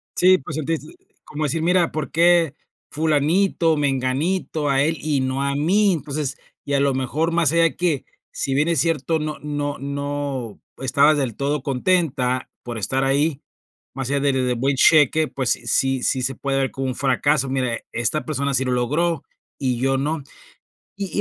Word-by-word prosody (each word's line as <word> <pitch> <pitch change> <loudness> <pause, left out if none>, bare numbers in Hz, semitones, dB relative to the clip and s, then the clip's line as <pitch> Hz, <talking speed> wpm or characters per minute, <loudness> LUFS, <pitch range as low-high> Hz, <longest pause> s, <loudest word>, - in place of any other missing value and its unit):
Sí, 185 +1 +5
pues 150 +2 -7
sentiste, 160 - -3 0.3
como 155 +1 -5
decir, 160 +2 -1
mira, 175 0 +2
¿por 155 -1 -4
qué 170 -2 +3 0.3
fulanito, 160 +2 +2
menganito, 145 +4 -1
a 135 0 +3
él 160 +2 0
y 150 -3 0
no 130 +1 -1
a 140 0 -1
mí?, 195 +8 +3
entonces, 145 -2 -3 0.3
y 140 - -3
a 140 - +3
lo 140 -1 +2
mejor 145 +6 -1
más 165 -4 +2
allá 165 -1 +3
que, 165 -6 0 0.3
si 135 - -2
bien 150 +3 +2
es 165 -4 +1
cierto, 160 +1 +1
no 155 0 -4
no 145 -1 -3
no 140 -4 -4 0.2
estabas 140 +3 +3
del 130 -6 -1
todo 140 0 -1
contenta 130 -3 0
por 120 -1 -6
estar 130 +5 -1
ahí, 140 +2 +1 0.5
más 135 -2 -4
allá 140 0 +1
del 135 -2 +1
de 125 - +1
buen 135 +4 0
cheque, 155 +2 +5
pues 130 -4 -3 0.2
sí 135 +2 +1
sí 130 - +1
se 130 +1 -2
puede 135 +1 -2
ver 135 -1 0
como 135 -1 -3
un 130 - -3
fracaso, 135 +1 +1
mira, 125 -3 -1
esta 120 +6 -1
persona 140 -2 -1
sí 130 - +1
lo 130 - -1
logró 150 +6 0 0.4
y 130 -3 0
yo 135 +1 +1
no. 150 +3 -1 0.8
Y 195 -2 -4
140 Hz, 180 wpm, -22 LUFS, 135-160 Hz, 0.8 s, Sí